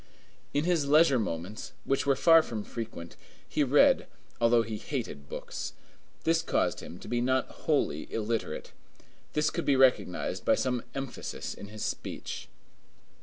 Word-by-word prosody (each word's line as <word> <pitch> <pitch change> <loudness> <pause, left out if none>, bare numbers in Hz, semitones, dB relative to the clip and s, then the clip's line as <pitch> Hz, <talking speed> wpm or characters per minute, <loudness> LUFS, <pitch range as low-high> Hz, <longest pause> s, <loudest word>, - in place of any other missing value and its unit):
In 145 - +1
his 165 -4 +1
leisure 150 -3 +6
moments, 95 0 -4
which 135 +1 0
were 140 - +5
far 165 +4 +7
from 110 -8 -5
frequent, 110 -9 -7 0.3
he - - +1
read, - - +5 0.3
although 115 0 +4
he 110 -1 -4
hated 70 0 -5
books; - - -5 0.5
this 165 0 +3
caused - - 0
him 85 - -9
to - - -11
be 120 0 0
not 130 +1 +2 0.2
wholly 140 - +1
illiterate. 115 0 -2 0.6
This 150 0 +2
could - - -2
be 140 - +3
recognized 130 -8 +2
by - - +4
some 125 -2 -1
emphasis 135 -2 -5
in 100 - -9
his 105 +1 -5
speech. - - -5
125 Hz, 150 wpm, -29 LUFS, 110-140 Hz, 0.6 s, far